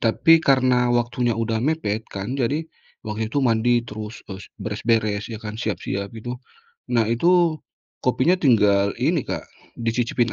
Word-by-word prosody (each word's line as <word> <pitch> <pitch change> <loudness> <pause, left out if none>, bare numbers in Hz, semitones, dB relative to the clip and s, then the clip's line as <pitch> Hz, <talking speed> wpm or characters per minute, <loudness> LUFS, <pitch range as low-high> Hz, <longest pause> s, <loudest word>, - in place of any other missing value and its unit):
tapi 165 +8 +4
karena 130 -4 +3
waktunya 120 0 0
udah 115 -1 -1
mepet 115 -7 -1
kan, 100 +5 -5
jadi 145 +7 0 0.4
waktu 110 0 -3
itu 145 - +1
mandi 120 +1 +2
terus 110 0 -8
es 95 +1 -10
beres-beres 105 0 -1
ya 115 - -5
kan, 110 -1 -6
siap-siap 100 -2 -3
itu. 120 +2 -5 0.6
Nah 115 -2 +3
itu 170 +7 +3 0.5
kopinya 130 +8 +3
tinggal 100 - +3
ini, - - +2
Kak, - - -4 0.4
dicicipin 115 0 0
115 Hz, 140 wpm, -22 LUFS, 110-125 Hz, 0.6 s, tapi